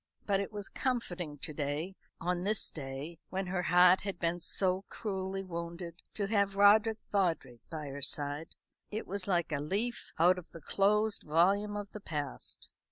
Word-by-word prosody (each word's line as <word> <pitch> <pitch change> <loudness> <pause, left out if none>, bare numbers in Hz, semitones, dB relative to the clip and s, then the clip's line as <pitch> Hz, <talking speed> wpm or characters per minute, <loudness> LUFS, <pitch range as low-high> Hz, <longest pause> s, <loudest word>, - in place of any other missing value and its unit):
But 200 -2 +2
it 200 - -3
was 205 -2 -5
comforting 180 - -2
to 150 - 0
day 150 +5 -2 0.2
on 175 0 0
this 210 +3 0
day 145 +3 -6
when 190 +1 -2
her 180 0 -1
heart 180 +1 +6
had 195 -3 -4
been 170 +1 0
so 185 +2 +1
cruelly 195 -3 -3
wounded 170 -1 -6
to 205 - 0
have 200 -1 +2
Roderick 215 +2 +6
Vawdrey 165 - +1
by 155 -2 -5
her 140 +1 -6
side. 145 +3 -2 0.3
It 215 +1 -3
was 200 0 -4
like 175 -4 +1
a 145 - 0
leaf 200 +11 -2
out 180 +3 +5
of 175 - -13
the 165 - -9
closed 210 +6 +2
volume 195 +7 +3
of 205 -1 -5
the 210 - -7
past. 145 - -5
180 Hz, 170 wpm, -32 LUFS, 165-200 Hz, 0.3 s, heart